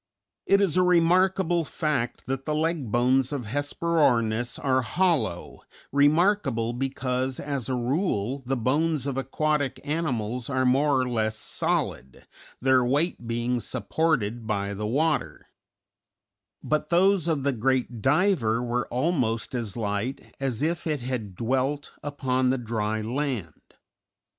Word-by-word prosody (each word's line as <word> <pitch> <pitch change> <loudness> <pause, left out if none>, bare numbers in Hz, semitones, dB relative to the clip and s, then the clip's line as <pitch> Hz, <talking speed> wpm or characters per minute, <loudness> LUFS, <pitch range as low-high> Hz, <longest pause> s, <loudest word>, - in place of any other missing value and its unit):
It 195 +1 +5
is 185 -4 +2
a - - +5
remarkable 180 0 +3
fact 145 -7 -2
that 135 +1 -3
the 150 - -1
leg 155 -6 -1
bones 125 +3 +2
of 140 -5 -3
Hesperornis 125 -4 +1
are 130 -1 +1
hollow, 125 - 0 0.3
remarkable 145 - +2
because 130 0 -2
as 140 -4 -3
a 130 - 0
rule 130 - -1
the 130 +2 -1
bones 145 +4 +1
of 140 -2 -2
aquatic 145 +1 -1
animals 125 -7 -2
are 130 -1 +1
more 135 +2 +3
or 130 - 0
less 110 -3 -1
solid, 65 - -2 0.3
their 130 0 +4
weight 140 0 0
being 120 +1 -1
supported 120 -1 -1
by 100 -2 -1
the 105 +1 -3
water; 135 - -1 1.1
but 150 0 -1
those 180 0 +3
of 155 -5 0
the 140 - +2
great 125 -1 0
diver 135 - +2
were 120 0 -1
almost 125 -5 -1
as 115 -5 -3
light 110 +4 -3
as 135 -1 -2
if 170 +1 -1
it 150 -4 -1
had 120 -6 -4
dwelt 130 +6 -1
upon 130 -3 0
the 130 - +2
dry 110 -2 -2
land. 120 - -4
130 Hz, 135 wpm, -26 LUFS, 120-150 Hz, 1.1 s, It